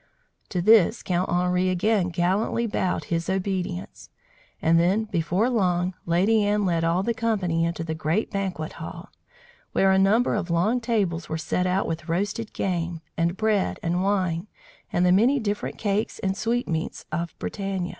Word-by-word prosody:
To 180 -3 -1
this 220 +1 +5
Count 180 0 0
Henri 180 +1 +1
again 185 +1 +1
gallantly 185 +7 0
bowed 190 -4 -1
his 165 +1 -2
obedience; 185 - -3 0.5
and 165 +1 +3
then, 190 +6 +2
before 190 +1 0
long, 185 -6 +1
Lady 200 +6 +3
Anne 205 0 +1
led 170 -2 +1
all 170 +3 +1
the 235 - 0
company 190 -8 0
into 170 0 -2
the 160 -1 -3
great 160 +6 -1
banquet 190 -5 -3
hall, 170 +3 -8 0.6
where 195 0 +4
a 190 - +4
number 210 +6 +3
of 200 -4 -2
long 190 +9 +2
tables 200 -8 -1
were 160 - -2
set 180 +3 -1
out 185 +2 +1
with 165 0 -4
roasted 205 +6 -2
game, 175 -3 -2
and 170 +2 0
bread 215 -2 +1
and 175 +2 0
wine 185 -2 0 0.4
and 175 - +2
the 180 - +4
many 240 +9 +4
different 210 -3 -3
cakes 205 0 -1
and 190 0 -1
sweetmeats 215 -6 -2
of 170 +2 -3
Bretagne. 195 -3 -3
185 Hz, 165 wpm, -25 LUFS, 170-205 Hz, 0.6 s, this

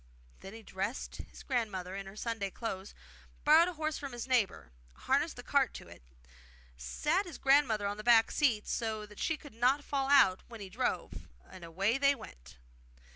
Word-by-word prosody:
Then 195 +3 -10
he 225 - -11
dressed 200 +6 -4
his - - -13
grandmother 200 -8 -2
in 195 0 -6
her 195 - -10
Sunday 225 -2 -3
clothes, 195 -2 -6 0.5
borrowed 315 +3 +6
a 360 - -3
horse 310 -1 -3
from 280 -3 -6
his 240 - -5
neighbour, 195 - 0 0.2
harnessed - - 0
the - - -9
cart - - +1
to - - -9
it, - - -14 0.7
sat 300 - -1
his 335 - -8
grandmother 270 -7 +3
on 200 +1 -2
the 215 - -7
back 230 -1 +5
seat 235 -8 +1
so 220 -2 -2
that 210 -1 -14
she 320 - 0
could 290 -4 -13
not 255 +5 +2
fall 275 -2 -1
out 260 -10 +5
when 230 -2 -10
he 195 -2 -8
drove, 245 +7 -3 0.2
and 185 - -11
away 195 +9 0
they 280 0 +4
went. 60 - -13
225 Hz, 185 wpm, -32 LUFS, 195-275 Hz, 0.7 s, borrowed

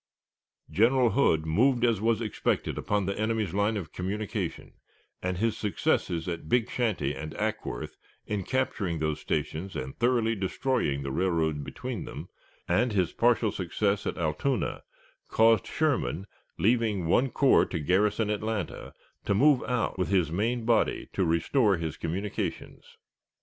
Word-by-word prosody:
General 120 +3 +4
Hood 80 - +2
moved 120 +9 +3
as 115 -4 +1
was 115 0 +2
expected 110 -3 -1
upon 105 -2 -1
the 100 +1 -2
enemy's 110 -2 0
line 105 +2 +1
of 90 -6 -6
communication, 100 +3 -4 0.5
and 90 0 -2
his 115 +3 +1
successes 90 -4 -1
at 85 -3 -5
Big 120 -1 +2
Shanty 110 - 0
and 75 +3 -7
Acworth, 110 - -3 0.3
in 105 -2 -2
capturing 105 -8 -1
those 75 -1 -1
stations 90 +5 -3
and 65 +1 -5
thoroughly 120 -2 +2
destroying 95 - -1
the 70 - -3
railroad 80 -3 0
between - - -5
them, - - -8 0.4
and 120 -1 +2
his 90 -4 +1
partial 115 -2 +3
success 100 +3 -1
at - - -3
Allatoona, 85 - -1 0.5
caused 115 -2 +4
Sherman, 140 - 0 0.3
leaving 110 -4 +1
one 125 +11 +3
corps 135 +2 +4
to 90 - -3
garrison 105 +7 +1
Atlanta, 105 -3 -3 0.3
to 100 - +1
move 140 +4 +5
out 120 -6 -1
with 90 - +1
his 90 -6 +2
main 115 +6 -1
body 115 -1 +1
to 95 - +1
restore 95 - +2
his 80 -2 -4
communications. 95 +5 -5
105 Hz, 145 wpm, -28 LUFS, 85-115 Hz, 0.5 s, move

